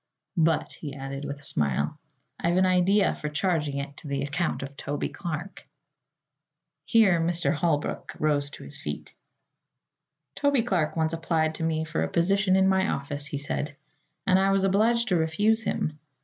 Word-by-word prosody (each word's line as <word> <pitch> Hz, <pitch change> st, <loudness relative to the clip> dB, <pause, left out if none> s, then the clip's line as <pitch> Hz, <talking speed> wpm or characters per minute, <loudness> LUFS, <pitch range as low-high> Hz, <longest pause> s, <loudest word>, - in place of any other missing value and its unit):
But," 160 Hz, -1 st, +2 dB
he 145 Hz, -3 st, -7 dB
added 135 Hz, +1 st, -6 dB
with 140 Hz, 0 st, -5 dB
a -, -, -19 dB
smile, 75 Hz, -, 0 dB, 0.4 s
"I've 175 Hz, +1 st, +1 dB
an 185 Hz, -, +5 dB
idea 185 Hz, +2 st, +3 dB
of 150 Hz, 0 st, -3 dB
charging 150 Hz, -4 st, 0 dB
it 140 Hz, 0 st, -5 dB
to -, -, -8 dB
the 140 Hz, -1 st, -1 dB
account 145 Hz, +2 st, -1 dB
of 140 Hz, +1 st, -8 dB
Toby 145 Hz, +1 st, -3 dB
Clark." 175 Hz, 0 st, -6 dB, 1.2 s
Here 200 Hz, -8 st, +4 dB
Mr. 170 Hz, +1 st, +1 dB
Holbrook 150 Hz, -2 st, -1 dB
rose 145 Hz, -2 st, +1 dB
to -, -, -11 dB
his -, -, -4 dB
feet. -, -, -6 dB, 1.2 s
"Toby 285 Hz, -4 st, +2 dB
Clark 180 Hz, -10 st, 0 dB
once 160 Hz, 0 st, +1 dB
applied 165 Hz, -1 st, 0 dB
to 160 Hz, -, -5 dB
me 160 Hz, -1 st, 0 dB
for 160 Hz, +1 st, -2 dB
a -, -, +1 dB
position 190 Hz, +3 st, +3 dB
in 190 Hz, 0 st, +4 dB
my 190 Hz, +1 st, +3 dB
office," 145 Hz, -1 st, -3 dB
he 145 Hz, -, -3 dB
said, 145 Hz, +1 st, -3 dB, 0.5 s
"and 185 Hz, 0 st, +4 dB
I 195 Hz, 0 st, +3 dB
was 195 Hz, 0 st, +2 dB
obliged 220 Hz, +5 st, +3 dB
to 180 Hz, -, +3 dB
refuse 205 Hz, +8 st, +2 dB
him. 155 Hz, -7 st, -2 dB
165 Hz, 170 wpm, -27 LUFS, 145-190 Hz, 1.2 s, an